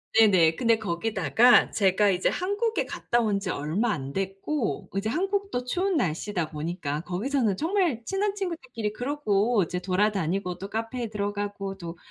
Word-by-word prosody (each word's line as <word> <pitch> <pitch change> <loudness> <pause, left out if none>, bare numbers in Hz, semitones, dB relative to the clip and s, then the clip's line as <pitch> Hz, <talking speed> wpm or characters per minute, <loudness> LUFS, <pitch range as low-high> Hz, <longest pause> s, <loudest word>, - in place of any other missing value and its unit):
네네. 185 -8 +5
근데 230 -2 +2
거기다가 220 +5 +3
제가 200 0 +3
이제 185 -1 +2
한국에 410 +5 -1
갔다 240 - -1
온 210 -4 +1
지 195 - -5
얼마 175 +11 0
안 140 -7 -4
됐고 195 - -2
이제 205 +2 -1
한국도 390 - -1
추운 365 +7 0
날씨다 175 - -1
보니까 150 -1 -3
거기서는 210 +4 0
정말 335 - +1
친한 395 +1 0
친구들끼리 260 - -4
그러고 240 -4 +1
이제 180 +2 -3
돌아다니고 185 -1 0
또 195 +2 -7
카페에 225 +2 -3
들어가고 205 -1 -3
또, 170 -2 -7
210 Hz, 340 characters per minute, -26 LUFS, 185-255 Hz, -, 네네